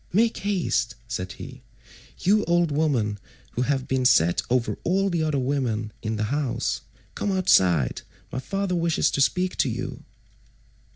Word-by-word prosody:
"Make 225 +5 +2
haste," 170 - 0
said 95 -5 -4
he, - - -10 0.6
"you 210 +3 +3
old 175 -2 +2
woman 130 -9 +1 0.3
who 120 - -2
have 135 0 0
been 130 -1 0
set 85 -8 +4
over 125 -1 0
all 195 +2 +1
the 170 -2 0
other 155 -2 0
women 125 -5 -1
in 110 0 -2
the 105 - -1
house. 135 -5 -1 0.3
Come 205 - -2
outside; 95 - +3 0.3
my 130 - -3
father 195 +7 -2
wishes 170 -2 +2
to 140 - 0
speak 180 +6 +1
to 135 - +2
you." 125 +3 -5
135 Hz, 155 wpm, -25 LUFS, 115-175 Hz, 0.6 s, set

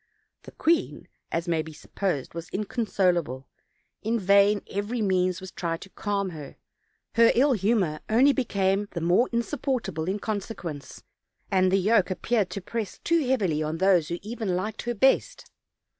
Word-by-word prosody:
The - - -12
queen, 330 0 0 0.2
as 165 +1 -2
may 165 -2 +1
be 160 0 -9
supposed, 175 -3 -3
was 170 0 -7
inconsolable; 180 - -1 0.5
in 230 +2 0
vain 200 +1 +4
every 205 +5 -3
means 185 -3 +1
was 190 -1 -9
tried 165 -2 -3
to 195 - -11
calm 200 -2 -2
her: 150 -4 -9 0.6
her 230 0 +6
ill 275 +3 +4
humor 195 -7 +1
only 260 +6 +5
became 200 -6 0
the 170 - -2
more 180 +9 +3
insupportable 235 - -2
in 190 +2 0
consequence, 190 - -5 0.5
and 185 -1 +3
the 195 - +4
yoke 205 +1 +3
appeared 205 +1 0
to 195 +2 -5
press 220 +2 -4
too 330 -5 +2
heavily 190 - +1
on 155 +1 -2
those 180 -3 +3
even 215 +6 -5
who 180 - +1
liked 210 +4 -3
her 240 0 -2
best. 270 - +1
195 Hz, 160 wpm, -26 LUFS, 175-230 Hz, 0.6 s, her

